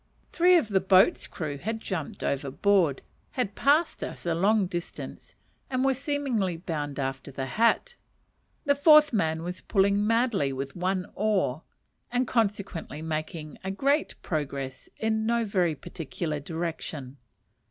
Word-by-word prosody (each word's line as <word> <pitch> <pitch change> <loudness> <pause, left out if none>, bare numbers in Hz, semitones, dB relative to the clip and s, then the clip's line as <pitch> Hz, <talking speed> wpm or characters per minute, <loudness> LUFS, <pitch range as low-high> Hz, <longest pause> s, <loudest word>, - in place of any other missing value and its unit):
Three 360 +1 +5
of 235 -10 0
the 195 -2 +3
boat's 190 0 +4
crew 145 -4 -5
had 225 +7 -3
jumped 185 -8 -5
overboard, 145 +3 +1 0.3
had 245 -6 -1
passed 300 +8 +2
us - - -7
a 170 - +1
long 200 +4 +3
distance, 175 0 -7 0.3
and 255 0 0
were 270 - +4
seemingly 260 - -1
bound 150 -5 -4
after 135 0 -3
the 135 0 -4
hat; 230 - +2 0.7
the 285 - +5
fourth 300 0 +6
man 160 -5 0
was 180 +1 -5
pulling 200 0 +2
madly 230 - +2
with 135 +1 -5
one 185 +1 -1
oar, 195 -10 0 0.5
and 250 +1 +1
consequently 200 -9 -1
making 155 -1 -4 0.2
great 280 +7 +1
progress 140 -4 -4
in 220 0 0
no 235 0 +2
very 180 -6 +1
particular 155 +2 -4
direction. 155 -4 -5
190 Hz, 135 wpm, -27 LUFS, 155-230 Hz, 0.7 s, fourth